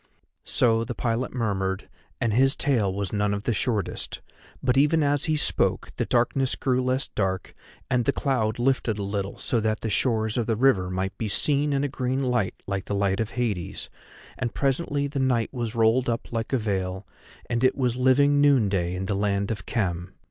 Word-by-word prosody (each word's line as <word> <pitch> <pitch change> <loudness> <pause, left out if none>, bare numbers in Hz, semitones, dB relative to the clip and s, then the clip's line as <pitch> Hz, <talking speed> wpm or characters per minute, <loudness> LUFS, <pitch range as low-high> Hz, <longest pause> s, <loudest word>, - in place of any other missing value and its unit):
So 115 -2 +3
the 120 0 -5
pilot 120 +1 -1
murmured, 95 -5 -2 0.3
and 115 -2 +1
his 135 +4 +4
tale 120 -9 +1
was 100 0 -3
none 105 -1 +1
of 100 - -5
the 115 - 0
shortest; 105 -3 -2 0.4
but 125 -1 +2
even 150 +3 +4
as 145 0 +2
he 155 -1 +1
spoke - - +1
the - - -1
darkness 125 +2 +1
grew 130 -1 +1
less 130 +1 -1
dark 95 -2 -2 0.3
and 125 -1 +1
the - - +3
cloud 115 -6 0
lifted 120 -3 +1
a 100 - -3
little 100 0 -3
so 120 - 0
that 110 0 -1
the 110 - -2
shores 110 -1 +1
of 115 - -1
the 115 - +1
river 105 -7 +3
might 95 +1 -2
be 110 - -1
seen 145 +7 +1
in 140 0 +1
a - - +1
green 130 -1 -2
light 125 -6 0
like 100 -1 -3
the 100 - -2
light 100 0 +1
of 110 -1 -1
Hades, 105 -8 -3 0.5
and 120 -2 -3
presently 140 +1 0
the 140 0 -3
night 125 -3 +1
was 120 -3 -3
rolled 115 +3 +3
up 115 - -3
like 115 -1 -3
a 135 - +3
veil, 95 -3 -2 0.4
and 120 +1 -1
it 130 - +4
was 125 -3 +1
living 140 +3 +4
noonday 100 -11 +3
in 95 +1 -3
the 100 - -1
land 100 0 0
of 100 -3 -5
Khem. 90 -5 -2
115 Hz, 200 wpm, -25 LUFS, 100-130 Hz, 0.5 s, his